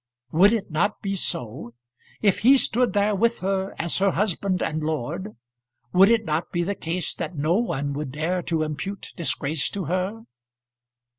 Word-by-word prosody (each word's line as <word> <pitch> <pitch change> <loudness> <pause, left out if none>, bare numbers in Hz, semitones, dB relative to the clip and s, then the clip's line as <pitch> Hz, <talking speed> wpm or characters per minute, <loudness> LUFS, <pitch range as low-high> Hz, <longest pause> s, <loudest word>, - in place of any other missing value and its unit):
Would 190 +6 +6
it 225 -7 -2
not 200 +9 0
be 195 -1 -1
so? 120 - -2 0.5
If 200 -3 +3
he 265 +5 +6
stood 250 -1 +3
there 205 0 +2
with 230 +4 +1
her 190 0 -1
as 170 0 0
her 195 +1 +3
husband 190 0 0
and 155 0 -2
lord, 160 - -3 0.6
would 195 +3 +7
it 225 -2 +3
not 155 +1 -2
be 175 - 0
the 200 +4 -1
case 175 -2 -3
that 165 -1 -5
no 155 +4 +1
one 145 - -1
would 145 -1 -4
dare 170 +5 -1
to 165 -2 -1
impute 175 +6 -5
disgrace 155 -3 -1
to 195 -3 -4
her? 185 +7 -2
180 Hz, 170 wpm, -24 LUFS, 155-200 Hz, 0.6 s, would